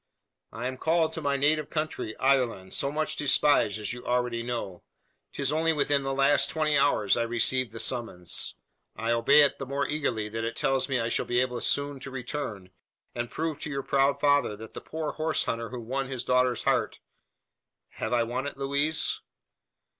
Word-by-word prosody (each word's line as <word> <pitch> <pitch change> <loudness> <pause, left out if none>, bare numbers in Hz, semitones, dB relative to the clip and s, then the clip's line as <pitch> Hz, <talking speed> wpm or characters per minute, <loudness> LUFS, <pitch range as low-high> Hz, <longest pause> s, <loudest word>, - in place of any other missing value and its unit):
"I 115 - -6
am 130 0 -3
called 160 +2 +1
to 165 - -5
my 140 -1 +1
native 150 +2 +2
country 155 -8 -3
Ireland, 125 -8 +1
so 140 - 0
much 155 +1 -1
despised, 145 -7 +3
as 105 +2 -2
you 125 - -8
already 125 -1 0
know. 115 -7 -4 0.5
'Tis 140 -1 -1
only 160 +1 +2
within 145 -1 +2
the 135 0 -2
last 140 +1 +3
twenty 155 -1 +1
hours 135 -8 +3
I 120 - 0
received 120 +1 +1
the 115 - -8
summons. 115 -7 -2 0.4
I 115 +1 -1
obey 115 +5 +6
it 140 - +1
the 135 - -4
more 140 +1 -1
eagerly, 130 -8 -1
that 115 +1 -4
it 115 0 -3
tells 135 +1 0
me 135 -2 +1
I 115 0 -1
shall - - -1
be 120 - +2
able 125 -2 -1
soon 140 -1 0
to 135 - -7
return, 125 -7 -5 0.4
and 120 0 -3
prove 160 -2 -3
to - - -5
your 140 -2 -3
proud 140 0 +2
father 145 -7 +3
that 110 +1 -11
the - - -7
poor 155 -1 -4
horse 155 0 0
hunter 115 -1 -3
who 125 - -6
won 135 +4 -3
his 130 -2 -4
daughter's 125 -1 +2
heart - - +1 0.9
have 110 - -5
I 120 -1 +3
won 125 +4 -3
it, 145 - -7
Louise?" 140 +3 +1
130 Hz, 190 wpm, -28 LUFS, 115-145 Hz, 0.9 s, obey